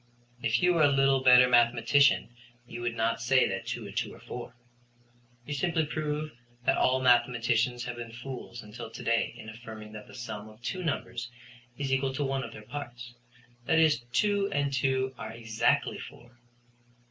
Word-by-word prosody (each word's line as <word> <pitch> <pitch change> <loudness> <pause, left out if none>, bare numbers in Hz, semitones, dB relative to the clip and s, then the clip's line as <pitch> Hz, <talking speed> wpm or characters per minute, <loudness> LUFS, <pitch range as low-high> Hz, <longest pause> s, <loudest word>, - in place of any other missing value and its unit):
"If 115 +8 +1
you 180 0 +5
were 165 - +2
a 150 - +7
little 135 -1 +3
better 125 -1 +7
mathematician 120 +2 +4 0.3
you 120 0 -8
would 120 -1 -2
not 115 0 0
say 130 +2 +4
that 95 0 -4
two - - -4
and - - -9
two - - -1
are - - -15
four. - - -8 0.9
You 145 - -4
simply 160 +3 +1
prove 150 0 -3 0.3
that - - +4
all 130 0 +3
mathematicians 120 -1 +3
have 120 0 -5
been 115 -1 -7
fools 120 -1 -8
until 115 +2 -8
to - - -9
day 115 0 +1
in - - -10
affirming 110 -1 -9
that 105 -1 -10
the - - -13
sum 110 -4 -6
of 110 0 -16
two 185 +10 -3
numbers 120 -6 -3 0.5
is 135 -2 -1
equal 135 0 0
to 145 - -1
one 135 -1 -1
of - - -7
their 105 - -11
parts; 120 -2 -8 0.5
that 160 - +3
is, 160 -6 +4
two 200 - +1
and 145 -1 0
two 130 0 +1
are 110 +1 -6
exactly 115 -1 0
four." 120 0 -12
125 Hz, 180 wpm, -29 LUFS, 115-140 Hz, 0.9 s, a